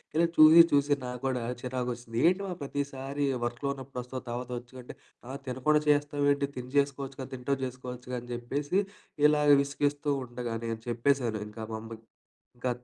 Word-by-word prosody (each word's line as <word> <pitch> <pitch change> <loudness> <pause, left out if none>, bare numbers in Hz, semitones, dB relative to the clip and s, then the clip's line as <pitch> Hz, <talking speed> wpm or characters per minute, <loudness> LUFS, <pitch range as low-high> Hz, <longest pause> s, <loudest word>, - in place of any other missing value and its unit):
ఇలా 170 +2 +4
చూసి, 155 +2 +10
చూసి 145 0 +3
నాకు 125 -1 -5
కూడా 125 -2 -1 0.2
చిరాకొచ్చేసింది. 125 -2 -4
"ఏంటి 185 +2 -1
మా 185 - -3
ప్రతిసారి 140 0 -3 0.2
వర్కులో 120 +4 -3
ఉన్నప్పుడు 130 -1 -6
వస్తావు 130 +1 -7
తర్వాత 125 +1 -4
వచ్చు, 120 +1 -18
అంటే - - -10 0.3
ఆ! - - -5
తినకుండా 130 +4 +2
చేస్తావేంటి? 145 -1 +2
తిని 125 0 -6
చేసుకోవచ్చుగా 135 -1 -3
తింటూ 130 +2 -1
చేసుకోవచ్చుగా" 125 0 -6
అని 120 - -13
చెప్పేసి 140 +9 -1 0.5
ఇలా 150 0 +3 0.2
విసిగిస్తూ 145 +1 -1 0.2
ఉండగా 120 -1 -5
నేను 115 -1 -3
చెప్పేసాను. 120 -1 +1
ఇంకా 110 +1 -8
మా - - -2
అమ్మకి 115 0 -10 0.5
ఇంకా 125 +1 -2
130 Hz, 155 wpm, -29 LUFS, 120-145 Hz, 0.5 s, చూసి